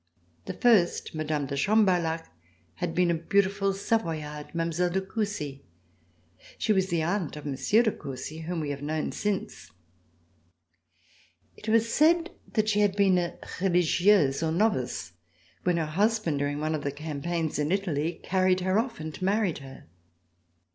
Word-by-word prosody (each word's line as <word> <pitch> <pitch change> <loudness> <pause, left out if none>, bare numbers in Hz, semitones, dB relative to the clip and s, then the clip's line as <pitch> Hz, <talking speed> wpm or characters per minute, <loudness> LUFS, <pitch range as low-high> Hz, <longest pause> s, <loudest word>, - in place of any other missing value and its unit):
The - - -5
first, 220 -8 +3
Mme. 155 -2 -1
de 140 - -4
Chambarlhac, 175 -2 +2 0.5
had 175 -2 -3
been 180 -1 +3
a - - +2
beautiful 195 +4 +1
Savoyarde, 160 -8 -2
Mile, 170 +1 0
de 185 +2 0
Coucy. 190 -8 -4 1.0
She 215 - +2
was 190 -2 +2
the 170 -3 0
aunt 175 -2 -1
of 150 - -9
Monsieur 150 - +2
de 220 - +2
Coucy 135 +2 -7
whom 170 -1 -2
we 145 -2 -2
have 140 -1 -5
known 155 +1 -2
since. 205 -2 -3 1.9
It 220 - -7
was 225 +1 +4
said 335 +3 +4 0.2
that 215 -2 +1
she 210 -1 +2
had 205 -2 +3
been 195 -3 +4
a 175 -1 -3 0.2
religteuse 175 -4 +3
or 160 -1 0
novice 160 - 0 0.5
when 180 -1 +1
her 165 - 0
husband, 195 -1 +1
during 145 +1 -1
one 155 +1 -1
of 150 -2 -3
the 140 - -1
campaigns 155 +2 -3
in 150 +2 0
Italy, 170 -4 -1
carried 185 0 +2
her 185 +3 +2
off 230 0 -3
and 155 -1 -7
married 195 -3 +1
her. 135 -1 -12
175 Hz, 155 wpm, -27 LUFS, 155-200 Hz, 1.9 s, was